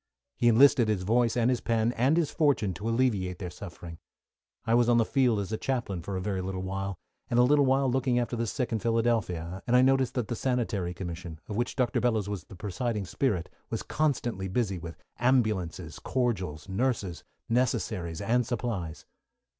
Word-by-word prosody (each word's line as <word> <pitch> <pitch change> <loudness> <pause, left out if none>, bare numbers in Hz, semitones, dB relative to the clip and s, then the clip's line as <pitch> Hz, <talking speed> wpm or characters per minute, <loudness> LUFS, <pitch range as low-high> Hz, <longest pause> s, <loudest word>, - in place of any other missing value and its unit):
He 120 - +2
enlisted 120 0 +6
his 105 -4 0
voice 115 +3 +2
and 120 +1 +3
his 125 - 0
pen 115 0 +1
and 130 +7 +2
his 165 -4 +1
fortune 140 - +2
to 105 +6 -4
alleviate 110 -7 +1
their 90 -2 -6
suffering. 85 -3 -9 0.7
I 115 - +1
was 120 0 +4
on 120 - +5
the 115 - +4
field 125 -5 +2
as 100 0 -4
a 110 - -2
chaplain 120 -9 -2
for 95 +3 -5
a - - -3
very 95 -1 -2
little 95 0 -4
while, 95 0 -3 0.3
and 120 - +1
a 120 - +7
little 140 +2 +4
while 135 +1 +3
looking 130 -1 +1
after 120 0 0
the 115 0 -1
sick 125 +3 -2
in 110 - 0
Philadelphia, 110 -7 0
and 120 - +3
I 125 - +6
noticed 135 -1 +3
that 125 -4 -1
the 120 - -2
Sanitary 110 -9 -1
Commission, 85 -2 -6
of 105 - -5
which 120 +2 -1
Dr. 125 -3 +1
Bellows 110 -5 +1
was 100 -4 -4
the - - -12
presiding 105 +3 -3
spirit, 95 -4 -1 0.2
was - - -3
constantly 120 -10 -1
busy 95 -2 -1
with 85 0 -8 0.2
ambulances, 100 - 0
cordials, 95 - -2
nurses, 95 - -1 0.2
necessaries 110 -8 -1
and 125 +2 +2
supplies. 110 -9 -4
115 Hz, 190 wpm, -28 LUFS, 95-125 Hz, 0.7 s, a